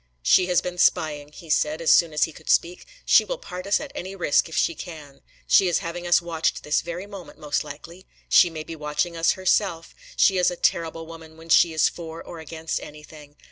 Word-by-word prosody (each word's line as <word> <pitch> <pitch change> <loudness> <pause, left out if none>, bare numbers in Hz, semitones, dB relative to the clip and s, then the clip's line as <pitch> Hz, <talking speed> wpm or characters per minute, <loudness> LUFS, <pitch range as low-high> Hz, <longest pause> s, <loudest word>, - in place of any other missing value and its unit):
"She 180 - +4
has 180 -2 +2
been 180 0 -5
spying," 150 -5 +1
he 165 0 -10
said, 155 +1 +1
as 165 - +2
soon 170 -2 +5
as 150 - +1
he 160 - 0
could - - -13
speak. 175 +1 +1 0.2
"She - - +6
will - - -4
part 180 - -8
us 200 - +2
at 290 - -8
any 190 +2 -6
risk, 170 -3 +1
if 160 - -6
she - - +2
can. 150 -5 -11 0.2
She 190 - +4
is 175 - +2
having 175 -1 -5
us 175 0 +3
watched 165 -2 -2
this 150 - +1
very 175 +3 -6
moment, 200 -3 -11
most 150 -1 -2
likely. 165 +5 -11 0.2
She 175 - +5
may 160 -2 -7
be 165 - -8
watching 150 +3 -2
us 165 0 +2
herself. 185 -2 0 0.2
She 190 -2 +3
is 180 - +3
a 175 - -5
terrible 165 -1 -1
woman 160 -1 -12
when 165 +1 -14
she 170 +1 +5
is 160 -1 +3
for 165 -1 -8
or 170 - -10
against 160 0 -5
anything. 150 -1 -13
165 Hz, 220 wpm, -24 LUFS, 155-180 Hz, 0.2 s, She